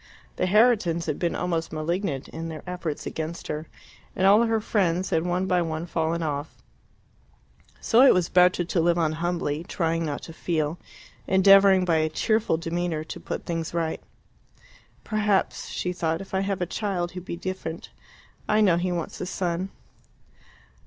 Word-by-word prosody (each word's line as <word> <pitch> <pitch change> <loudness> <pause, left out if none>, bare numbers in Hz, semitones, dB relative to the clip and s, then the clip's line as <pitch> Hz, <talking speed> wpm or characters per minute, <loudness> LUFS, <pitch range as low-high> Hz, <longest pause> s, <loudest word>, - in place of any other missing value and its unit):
The 185 - +1
Herritons 200 -6 +3
had 145 - -2
been 170 -1 0
almost 165 -2 -2
malignant 155 -2 -2
in 165 +1 -6
their 155 -2 -7
efforts 175 -4 -4
against 160 +1 -5
her, 155 +1 -4 0.5
and 190 - +1
all 205 +3 +7
her 225 -1 +2
friends 190 -4 0
had 160 - +2
one 180 +1 0
by 180 -1 +2
one 160 0 -3
fallen 165 0 -1
off. 145 0 -3 1.2
So 230 - +4
it 270 - +8
was 180 -2 +2
better 180 0 +4
to 170 0 0
live 170 +1 +2
on 160 -2 +2
humbly, 165 -2 -2
trying 165 -1 -1
not 145 -3 -4
to 165 - -9
feel, 160 -1 -2 0.5
endeavouring 195 0 +6
by 165 -2 +2
a 155 0 +1
cheerful 215 +2 +1
demeanour 165 -1 -2
to 160 - -8
put - - -5
things 165 -1 -3
right. 165 -1 -1 1.0
"Perhaps," 210 -2 0
she 180 - -3
thought, 165 -2 -1
"if 195 - -10
I 190 - +2
have 195 -1 -2
a - - 0
child 180 -2 -2
he 180 - -6
will 180 - -14
be 170 - -5
different. 175 -3 -5 0.6
I 215 - +4
know 190 -6 +4
he 180 +1 -1
wants 170 -2 -4
a 185 - -3
son." 180 0 -2
175 Hz, 175 wpm, -25 LUFS, 160-190 Hz, 1.2 s, it